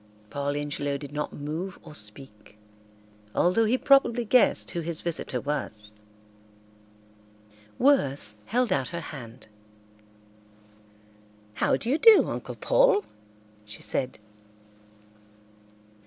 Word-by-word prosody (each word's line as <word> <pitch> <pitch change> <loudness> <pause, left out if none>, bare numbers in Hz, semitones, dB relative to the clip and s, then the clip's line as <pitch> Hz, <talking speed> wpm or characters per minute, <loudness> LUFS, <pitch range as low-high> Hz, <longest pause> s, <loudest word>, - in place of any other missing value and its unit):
Paul 145 +1 -2
Ingelow 145 -1 -2
did 140 0 -9
not 150 0 -3
move 160 +6 -5
or - - -12
speak, 105 -3 -7 0.8
although 185 +6 +3
he 235 +4 +2
probably 250 -4 +3
guessed 250 +3 +3
who 175 - -3
his 165 -1 -2
visitor 160 -6 -2
was. 105 -7 -4 1.8
Worth 140 - +2
held 245 +2 +1
out 130 -2 0
her 170 - -5
hand. 120 -5 -10 2.1
"How - - +2
do - - -5
you 280 +6 +1
do, 450 -2 +7
Uncle - - -5
Paul?" - - +3 0.6
she 105 0 -10
said. 130 - -2
150 Hz, 105 wpm, -26 LUFS, -, 2.1 s, do